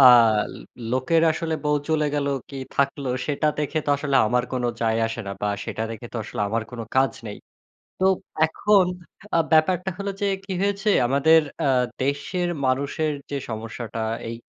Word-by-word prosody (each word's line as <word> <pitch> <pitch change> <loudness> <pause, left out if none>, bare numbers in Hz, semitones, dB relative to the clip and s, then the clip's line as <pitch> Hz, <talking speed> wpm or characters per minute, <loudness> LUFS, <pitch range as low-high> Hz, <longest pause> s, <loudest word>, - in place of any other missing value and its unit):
আল 115 -5 +7 0.4
লোকের 145 +6 +2
আসলে 160 0 -2
বউ 150 0 +3
চলে 155 -1 +2
গেল 145 -1 0 0.2
কি 140 - -8 0.2
থাকলো! 140 0 0 0.2
সেটা 150 +1 0
দেখে 150 +1 -1
তো 145 - +2
আসলে 140 -1 0
আমার 125 +3 +1
কোনো 125 -2 0
যায় 115 -1 +1
আসে 115 +1 -4
না 100 - -3
বা 105 - +1 0.2
সেটা 110 - -4
দেখে 115 +1 -7
তো - - -5
আসলে 105 - -6
আমার 115 +2 0
কোন 120 -2 -7 0.2
কাজ 130 0 +4
নেই। 105 - -6 0.6
তো 190 - +2 0.4
এখন 195 +4 +3 0.5
আ - - +5
ব্যাপারটা 180 +4 +3
হলো 200 0 -3
যে - - +2 0.2
কি 195 - -4
হয়েছে, 200 +1 0 0.2
আমাদের 140 +5 +5 0.2
আ - - +3 0.3
দেশের 145 +7 -1 0.2
মানুষের 140 +4 0 0.2
যে - - -1
সমস্যাটা 115 +1 -5 0.3
এই 115 - -4
140 Hz, 170 wpm, -24 LUFS, 120-160 Hz, 0.6 s, আল